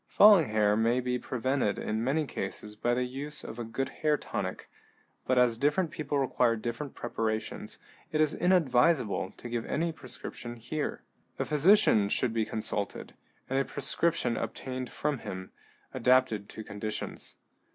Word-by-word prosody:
Falling 200 - +7
hair 105 -1 +3
may 115 +3 +2
be 125 0 -1
prevented 130 -4 0
in 110 +1 -2
many 150 +5 +1
cases 105 -5 -5
by 120 +3 +1
the 125 - +1
use 140 +4 -3
of 115 - -7
a - - -2
good 120 +4 -3
hair 150 -1 +1
tonic, - - -4 0.6
but 130 - +2
as 120 -2 +4
different 150 +4 +2
people 150 -3 -2
require 125 -3 +2
different 120 +5 -5
preparations, 110 -2 -3 0.3
it 155 - 0
is 155 -1 +3
inadvisable 155 - +3
to - - -8
give 120 -1 -2
any 165 +2 0
prescription 130 -4 -7
here. 120 +6 -4 0.3
A - - -1
physician 150 - +5
should 115 +2 0
be 110 -1 +1
consulted, 105 -3 -3 0.3
and 135 +1 +1
a - - +3
prescription 165 -5 +1
obtained 130 -1 -4
from 145 0 -2
him, 95 -3 -7 0.4
adapted 125 -4 +2
to 110 - -7
conditions. 105 +1 -5
125 Hz, 150 wpm, -30 LUFS, 115-150 Hz, 0.6 s, Falling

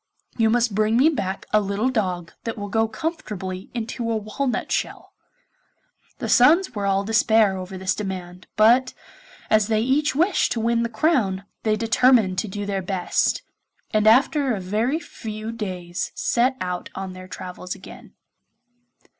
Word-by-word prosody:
You 225 -2 +3
must 235 -1 +2
bring 215 +2 +2
me 280 +6 +6
back 195 -10 -3
a 215 - +5
little 200 +5 0
dog 180 -7 -2
that 230 - -4
will 205 -1 -5
go 225 +2 +2
comfortably 210 - -5
into 235 0 -3
a 225 - +1
walnut 225 +5 -3
shell.' - - -3 1.0
The - - -4
sons 320 +7 +5
were 205 -3 -2
all 195 0 +2
in - - -7
despair 220 -2 +3
over 185 0 -6
this 190 0 0
demand, 185 -3 -6
but 240 +4 +4 0.6
as 215 -1 +4
they 220 -1 +1
each 270 +4 +1
wished 345 +6 +2
to 230 - -3
win 230 +1 +1
the 235 - -1
crown, 220 - +1 0.2
they 215 -1 +1
determined 225 -3 +3
to 220 - -2
do 205 +1 -5
their 200 -1 -2
best, 185 -1 0 0.5
and 215 -1 +2
after 265 +2 +4
a - - -4
very 220 - 0
few 220 -7 -7
days 185 -5 -4
set 255 +2 +1
out 180 -2 -4
on 190 -1 -5
their 185 0 -10
travels 180 0 -7
again. - - -13
215 Hz, 165 wpm, -23 LUFS, 190-235 Hz, 1.0 s, me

